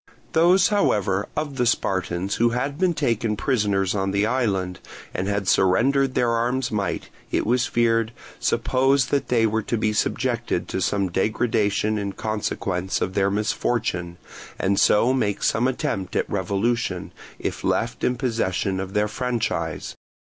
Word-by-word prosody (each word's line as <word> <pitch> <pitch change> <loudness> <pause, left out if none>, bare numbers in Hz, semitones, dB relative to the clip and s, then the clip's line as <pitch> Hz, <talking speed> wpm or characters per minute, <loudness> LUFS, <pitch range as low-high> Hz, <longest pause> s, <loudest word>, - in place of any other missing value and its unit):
Those 175 +4 +5
however 105 - +1
of 145 -3 -3
the 125 -1 +2
Spartans 95 -3 0
who 120 +1 +3
had 135 +5 -2
been 185 -3 +2
taken 115 -6 0
prisoners 100 -6 +1
on 95 -1 -1
the 100 +2 +1
island 100 -7 -1 0.3
and 95 +2 -2
had 100 -1 -1
surrendered 130 +10 +3
their 120 -1 +2
arms 120 +2 0
might, 100 -5 -2 0.2
it - - 0
was 120 +3 +2
feared, 115 -1 +2 0.3
suppose 135 +1 +2
that 140 - 0
they 115 -2 +3
were 110 0 +1
to 115 +3 -2
be 110 0 0
subjected 120 -4 -1
to 95 - -2
some 100 +1 0
degradation 110 +1 +1
in 100 -1 -3
consequence 95 -4 -2
of 95 - -2
their 100 0 +2
misfortune, 100 -4 -1 0.4
and 100 +1 +1
so 120 +5 +4
make 105 -6 -1
some 120 +3 +2
attempt 95 -7 -2
at - - +1
revolution, 100 0 -1 0.3
if - - -4
left - - -1
in 125 - +2
possession 100 -6 -1
of 95 0 -5
their 105 0 +2
franchise. 105 -9 -2
110 Hz, 150 wpm, -23 LUFS, 95-125 Hz, 0.4 s, Those